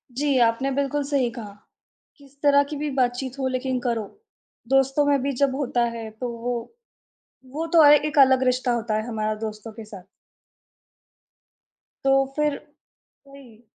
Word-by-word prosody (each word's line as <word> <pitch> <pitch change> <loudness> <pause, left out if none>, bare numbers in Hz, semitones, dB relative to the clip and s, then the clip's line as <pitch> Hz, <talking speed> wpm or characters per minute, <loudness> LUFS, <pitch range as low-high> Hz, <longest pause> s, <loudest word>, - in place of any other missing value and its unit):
जी, 280 0 +1
आपने 235 +3 +2
बिल्कुल 280 +1 -1
सही 275 -3 0
कहा, 220 -4 -9 0.6
किस 280 -2 -20
तरह 285 -1 +5
की 300 - -4
भी 295 +1 -3
बातचीत 250 +2 -2
हो 265 - -2
लेकिन 255 0 -2
करो, 235 -2 -1 0.7
दोस्तों 270 +2 +2
में 285 -2 +2
भी 280 - -1
जब 275 -2 +2
होता 245 -4 0
है 225 -1 -6
तो 230 +3 -6
वो 245 +1 -3 1.0
वो 320 +2 -2
तो 330 - +7
अ, 295 - +8
एक 295 0 +3
अलग 265 -1 +5
रिश्ता 255 -1 +1
होता 230 -2 -2
है 215 - -3
हमारा 215 -1 -2
दोस्तों 215 +1 -8
के 220 0 -10
साथ। 205 -3 -11 2.0
तो 270 0 +3
फिर 300 -1 0 0.7
वही। 255 -5 -16
260 Hz, 155 wpm, -23 LUFS, 235-280 Hz, 2.0 s, अ